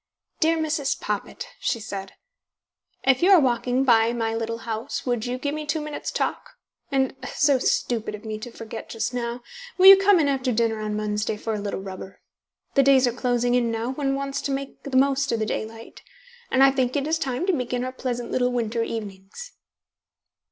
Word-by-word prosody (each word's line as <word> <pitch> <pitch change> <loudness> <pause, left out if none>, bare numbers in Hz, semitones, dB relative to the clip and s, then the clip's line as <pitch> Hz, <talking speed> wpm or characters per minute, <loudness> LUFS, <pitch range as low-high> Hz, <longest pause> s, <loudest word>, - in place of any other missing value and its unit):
"Dear 325 +1 +3
Mrs. 310 -3 -1
Poppit," - - -4
she 230 - -1
said, 195 -3 -7 0.9
"if 265 -1 +3
you 360 - +4
are 385 -3 +8
walking 250 -1 +1
by 230 -2 +4
my 225 -1 -1
little 230 0 -3
house, 225 -1 -4
would 245 -2 -1
you 250 +1 -2
give 285 +3 -3
me 305 0 -4
two 305 +2 0
minutes' 300 -1 -5
talk? - - -3 0.4
And 265 -1 +1 0.2
so 285 -2 +3
stupid 230 -4 0
of 210 +2 -13
me 215 -1 -4
to 245 - -7
forget 225 -1 -8
just 225 +2 -3
now 240 0 -3 0.3
will 370 - +4
you 390 0 +13
come 390 -1 +4
in 300 - +2
after 265 -2 0
dinner 225 -1 +1
on 210 0 -3
Wednesday 210 0 -2
for 225 +1 -3
a 210 - -2
little 200 -1 -4
rubber? 190 -1 -9 0.5
The 275 - +5
days 270 -1 +5
are 245 - 0
closing 245 -1 0
in 245 -1 +2
now; 230 +2 -2
one 270 0 -1
wants 275 0 -3
to 280 - -3
make 275 0 -5
the 270 -2 -1
most 275 0 +2
of - - +1
the 220 - -1
daylight, 225 +1 -6 0.5
and 265 +1 +4
I 275 - +7
think 260 -2 0
it 280 -1 0
is 320 +1 0
time 265 +1 -2
to 380 - +2
begin 250 -3 -2
our 255 - -3
pleasant 245 -2 -4
little 250 -1 +1
winter 235 -1 -1
evenings." 215 - -6
245 Hz, 200 wpm, -24 LUFS, 225-275 Hz, 0.9 s, you